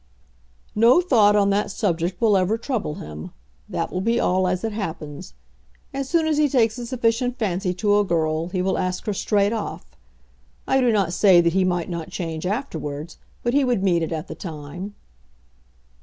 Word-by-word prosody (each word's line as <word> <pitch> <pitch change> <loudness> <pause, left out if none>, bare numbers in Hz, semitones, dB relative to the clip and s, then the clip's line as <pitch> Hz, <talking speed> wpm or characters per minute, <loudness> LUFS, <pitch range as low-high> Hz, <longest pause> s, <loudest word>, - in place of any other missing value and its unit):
"No 230 +8 +5
thought 225 - +4
on 200 -1 +3
that 205 +1 +1
subject 180 -3 -1
will 220 -3 +4
ever 190 +4 +2
trouble 225 - -3
him. 75 +1 -8 0.4
That - - -3
will 185 - -1
be 230 +4 +1
all 185 +1 +2
as 180 +2 -1
it 225 - -1
happens. 160 -6 -6 0.6
As 270 -1 -3
soon 335 -2 +2
as 310 -1 +1
he 300 -1 +3
takes 235 -3 +2
a 240 - -5
sufficient 245 0 0
fancy 190 -3 -1
to 205 +2 +2
a - - +3
girl 160 -3 0
he 180 -1 -1
will 190 - 0
ask 185 0 -2
her 210 - -1
straight 205 +1 +1
off. 220 -2 -4 0.8
I 265 - +3
do 245 -2 +3
not 195 -6 +1
say 185 -2 +6
that 170 -1 +1
he 190 0 +3
might 175 -2 0
not 170 -3 -5
change 165 -1 -4
afterwards, 170 - -4 0.3
but 240 - 0
he 285 0 +4
would 245 -7 +1
mean 175 -3 +2
it 165 - -2
at 160 +1 -4
the - - -6
time." 175 +4 -7
200 Hz, 190 wpm, -23 LUFS, 175-230 Hz, 0.8 s, say